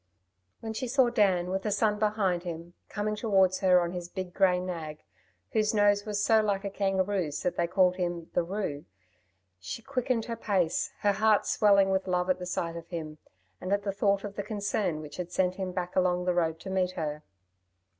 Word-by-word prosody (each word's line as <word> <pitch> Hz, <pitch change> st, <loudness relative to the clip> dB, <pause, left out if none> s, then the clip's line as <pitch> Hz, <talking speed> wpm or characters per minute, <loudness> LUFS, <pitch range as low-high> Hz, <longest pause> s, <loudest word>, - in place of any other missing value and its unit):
When 220 Hz, -1 st, -5 dB
she 255 Hz, +3 st, -3 dB
saw 250 Hz, -1 st, +3 dB
Dan, 190 Hz, -6 st, +2 dB
with 190 Hz, 0 st, -1 dB
the 210 Hz, -, -2 dB
sun 210 Hz, 0 st, +1 dB
behind 210 Hz, -5 st, +1 dB
him, 170 Hz, 0 st, -7 dB, 0.2 s
coming 210 Hz, 0 st, -2 dB
towards 195 Hz, -4 st, +2 dB
her 185 Hz, -2 st, +5 dB
on 170 Hz, 0 st, -2 dB
his 175 Hz, -1 st, -6 dB
big 185 Hz, -1 st, -6 dB
grey 185 Hz, -2 st, +3 dB
nag, 165 Hz, -, -6 dB, 0.5 s
whose 215 Hz, 0 st, +1 dB
nose 205 Hz, 0 st, +3 dB
was 205 Hz, -1 st, -1 dB
so 220 Hz, -1 st, +5 dB
like 200 Hz, -2 st, -1 dB
a 200 Hz, -, -3 dB
kangaroo's 190 Hz, -5 st, -1 dB
that 180 Hz, -, 0 dB
they 170 Hz, -, 0 dB
called 185 Hz, 0 st, +3 dB
him 175 Hz, -2 st, -3 dB
"the -, -, +2 dB
'Roo," 170 Hz, -5 st, -4 dB, 0.7 s
she 155 Hz, -, -6 dB
quickened 255 Hz, -3 st, -1 dB
her 235 Hz, -, -4 dB
pace, 190 Hz, -7 st, 0 dB
her 205 Hz, -, +3 dB
heart 215 Hz, 0 st, +3 dB
swelling 200 Hz, -2 st, +4 dB
with 190 Hz, 0 st, 0 dB
love 180 Hz, 0 st, +1 dB
at 185 Hz, -, -1 dB
the 180 Hz, -, -5 dB
sight 170 Hz, -2 st, -2 dB
of 170 Hz, 0 st, -8 dB
him, 155 Hz, -3 st, -6 dB, 0.4 s
and 185 Hz, -, -4 dB
at 200 Hz, 0 st, +1 dB
the 200 Hz, -1 st, -2 dB
thought 200 Hz, 0 st, +1 dB
of 205 Hz, -1 st, -6 dB
the -, -, 0 dB
concern 200 Hz, -5 st, -2 dB
which 150 Hz, -1 st, -10 dB
had 180 Hz, -1 st, -5 dB
sent 180 Hz, 0 st, 0 dB
him 190 Hz, -2 st, -3 dB
back 180 Hz, -1 st, -4 dB
along 180 Hz, -1 st, +2 dB
the 180 Hz, -, +2 dB
road 165 Hz, -2 st, 0 dB
to 190 Hz, -, -6 dB
meet 185 Hz, -1 st, 0 dB
her. 150 Hz, -3 st, -4 dB
190 Hz, 205 wpm, -29 LUFS, 175-205 Hz, 0.7 s, her